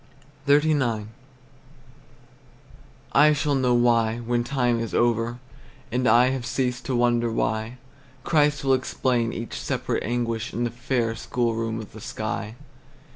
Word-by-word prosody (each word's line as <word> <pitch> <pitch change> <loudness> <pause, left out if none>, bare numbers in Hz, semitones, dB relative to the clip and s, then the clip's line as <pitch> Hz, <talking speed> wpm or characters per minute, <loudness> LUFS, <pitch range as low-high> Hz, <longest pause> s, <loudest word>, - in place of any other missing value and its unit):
XXXIX. 140 -7 +2 2.1
I 150 +2 +6
shall 145 0 0
know 130 -3 +2
why, 115 -2 +3
when 120 0 -1
time 125 -3 0
is 115 -1 -4
over, 120 0 +1 0.5
And 125 +1 0
I 125 +2 +5
have 130 -2 -3
ceased 125 0 -2
to 130 - -1
wonder 120 -1 +2
why; 110 +2 -2 0.5
Christ 150 -2 +2
will 135 -1 +3
explain 125 -2 0
each 115 - -6
separate - - -2
anguish 115 -1 -2
In 120 - -1
the 120 - -1
fair 120 -1 -1
schoolroom 115 0 -2
of 110 - -9
the 110 - -11
sky. 110 0 -4
120 Hz, 130 wpm, -24 LUFS, 115-130 Hz, 2.1 s, I